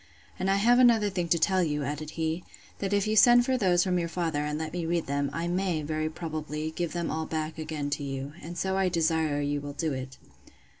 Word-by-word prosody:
And 190 - 0
I 195 - +4
have 235 +5 +4
another 225 -5 +5
thing 180 -2 -2
to 170 - +3
tell 185 +3 +2
you, 150 -3 -1
added 150 +2 -4
he, 160 +2 -1 0.4
that 195 -1 -2
if 200 -1 +2
you 215 0 0
send 240 +3 +7
for 260 - +1
those 180 -7 +3
from 180 -2 +1
your 170 -1 -2
father, 165 -4 -1
and 150 0 -2
let 160 0 -4
me 175 -1 -2
read 170 0 0
them, 140 0 -1
I 170 +1 -3
may, 175 -3 0
very 155 +1 -1
probably, 155 -1 -4
give 170 0 -3
them 170 -1 -2
all 160 0 -2
back 155 0 -3
again 155 -2 -4
to 145 - -2
you. 135 +1 -5
And 170 +3 -8
so 190 +2 0
I 190 -1 +2
desire 160 -3 +1
you 145 0 -1
will 145 0 -6
do 155 0 -1
it. 130 0 -6
160 Hz, 240 wpm, -28 LUFS, 150-185 Hz, 0.4 s, send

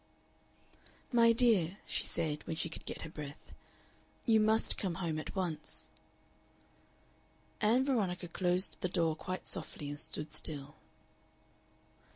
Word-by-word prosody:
"My 230 -2 +6
dear," 215 -7 +3
she - - 0
said, 150 -2 -1
when 165 - -2
she 165 - 0
could - - -6
get - - -4
her 165 - -6
breath, 150 -3 -9 0.7
"you 225 -2 +5
must 220 +1 +3
come 185 -5 -1
home 165 -3 -2
at 155 - -7
once." 170 -5 -2 1.7
Ann 240 +5 +4
Veronica 190 -9 0
closed 180 +2 0
the 180 - 0
door 165 -3 +1
quite 185 +3 -5
softly 145 - +1
and 145 0 -5
stood 150 0 -5
still. 145 -2 -2
175 Hz, 130 wpm, -34 LUFS, 155-215 Hz, 1.7 s, My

